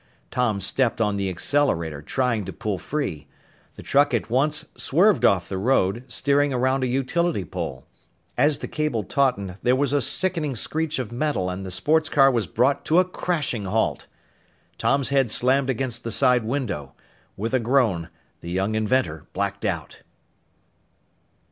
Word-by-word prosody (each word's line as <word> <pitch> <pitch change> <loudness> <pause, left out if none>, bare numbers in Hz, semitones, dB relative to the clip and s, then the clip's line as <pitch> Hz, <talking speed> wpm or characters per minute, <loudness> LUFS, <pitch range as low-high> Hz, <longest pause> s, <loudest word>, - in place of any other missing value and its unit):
Tom 120 -5 0
stepped 115 +6 +1
on 105 -2 +1
the 100 -1 -1
accelerator, 85 - 0
trying 120 - -1
to 95 - -5
pull 105 -6 -3
free. 115 - -4 0.5
The - - -11
truck 145 -2 +3
at 115 -1 -3
once 145 +4 +1
swerved 190 +8 +3
off 90 -3 +3
the 95 - -4
road, 115 0 +1
steering 140 +3 +1
around 130 +1 +1
a - - +1
utility 135 - 0
pole. 65 -3 -5 0.5
As 145 +3 +3
the - - -6
cable 150 -8 -1
tautened, 100 -6 0
there 125 +1 +3
was 140 0 0
a 145 - +2
sickening 160 0 -1
screech 160 +6 -2
of 125 -4 -4
metal 120 -8 -1
and 90 +1 -5
the 95 - -6
sports 155 - +1
car 135 -2 +5
was 115 -5 0
brought 135 +3 +1
to 160 - +2
a 185 - +5
crashing 155 - -2
halt! 110 +4 -1 0.7
Tom's 140 -2 +2
head 135 -3 +2
slammed 130 +4 +2
against 120 -2 -2
the 115 - -4
side 125 -1 +3
window. 110 - -3 0.4
With 115 +5 -3
a 130 - +3
groan, 115 -9 +1 0.3
the 85 - -8
young 95 +4 -1
inventor 110 - 0
blacked 100 +2 -2
out. 85 -6 -3
125 Hz, 160 wpm, -24 LUFS, 100-140 Hz, 0.7 s, car